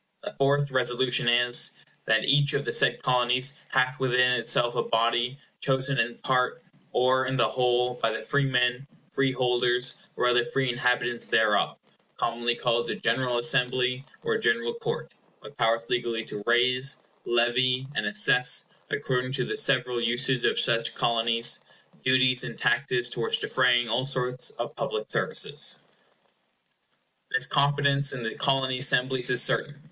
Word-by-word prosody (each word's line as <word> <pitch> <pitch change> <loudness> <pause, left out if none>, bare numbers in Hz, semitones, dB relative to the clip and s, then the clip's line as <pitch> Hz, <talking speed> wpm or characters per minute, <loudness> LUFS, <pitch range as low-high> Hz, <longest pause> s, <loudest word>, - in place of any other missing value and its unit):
The - - -7
fourth 140 +1 +1
Resolution 125 -1 +1
is— 120 0 +3 0.3
"That 110 0 +2
each 145 +1 +3
of 140 - -2
the - - -3
said - - +2
Colonies 125 +2 +1 0.2
hath 130 +2 0
within 125 -1 +2
itself 120 0 +1
a - - -1
body, 120 +3 0 0.2
chosen 135 0 0
in 120 +1 -1
part, 130 +5 -1 0.3
or 130 +1 +1
in 130 0 -2
the 120 - +3
whole, 125 0 0
by 115 - +2
the 110 - -5
freemen, 130 -1 0 0.2
free 135 -1 0
holders, 125 0 0 0.2
or - - -1
other 120 0 +3
free 135 -3 -1
inhabitants 120 -1 -1
thereof, 105 -2 +1 0.4
commonly 120 0 -1
called 120 -1 -1
the - - -3
General 125 +1 -1
Assembly, 125 +2 +1 0.2
or 450 -1 -1
General 435 +2 0
Court, 465 0 -5 0.3
with - - -13
powers 115 +1 0
legally 115 -2 -2
to 105 - -7
raise, 125 +3 +1 0.3
levy, 125 +2 +1
and - - -2
assess, 125 -12 +3 0.2
according 130 0 -2
to - - -1
the - - -4
several 125 -2 0
usage 120 +2 +1
of - - +1
such 115 -2 +2
Colonies 115 0 +1 0.4
duties 130 -1 +3
and - - -7
taxes 125 -3 +1
towards 120 -1 -2
defraying 125 -2 +1
all 125 +4 -1
sorts 125 -2 0
of - - -7
public - - -4
services" - - 0 1.5
This 130 0 +2
competence 140 0 +1
in 125 -3 -6
the 110 - -4
Colony 130 -2 0
Assemblies 130 -1 +2
is 125 -1 +5
certain. 145 -1 0
125 Hz, 150 wpm, -26 LUFS, 120-130 Hz, 1.5 s, is